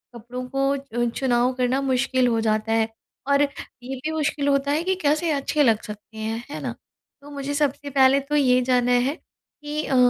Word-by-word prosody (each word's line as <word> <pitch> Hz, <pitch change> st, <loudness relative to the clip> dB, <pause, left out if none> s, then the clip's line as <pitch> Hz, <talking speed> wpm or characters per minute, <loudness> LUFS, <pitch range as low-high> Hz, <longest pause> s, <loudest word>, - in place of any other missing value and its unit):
कपड़ों 245 Hz, +2 st, -7 dB
को 275 Hz, -3 st, 0 dB
चुनाव 245 Hz, 0 st, +1 dB
करना 255 Hz, +2 st, 0 dB
मुश्किल 260 Hz, -1 st, +1 dB
हो 230 Hz, -1 st, +1 dB
जाता 215 Hz, 0 st, 0 dB
है, 225 Hz, 0 st, +2 dB, 0.4 s
और 280 Hz, 0 st, +4 dB
ये 270 Hz, -2 st, -4 dB
भी 285 Hz, +5 st, -4 dB
मुश्किल 295 Hz, -2 st, -1 dB
होता 280 Hz, 0 st, +2 dB
है 310 Hz, +3 st, +1 dB
कि 380 Hz, +1 st, +1 dB
कैसे 310 Hz, +3 st, +2 dB
अच्छे 290 Hz, +1 st, +1 dB
लग 225 Hz, -4 st, +3 dB
सकते 210 Hz, +1 st, -10 dB
हैं, 225 Hz, +2 st, -3 dB
है -, -, -5 dB
ना? -, -, -3 dB, 0.5 s
तो 290 Hz, -, -13 dB
मुझे 280 Hz, 0 st, -4 dB
सबसे 285 Hz, -1 st, -1 dB
पहले 270 Hz, 0 st, +5 dB
तो 280 Hz, +2 st, -3 dB
ये 255 Hz, -3 st, +4 dB
जानना 250 Hz, -1 st, +2 dB
है 250 Hz, +5 st, +2 dB
कि 300 Hz, -3 st, -8 dB
अ, 270 Hz, -, 0 dB
265 Hz, 190 wpm, -23 LUFS, 245-285 Hz, 0.5 s, पहले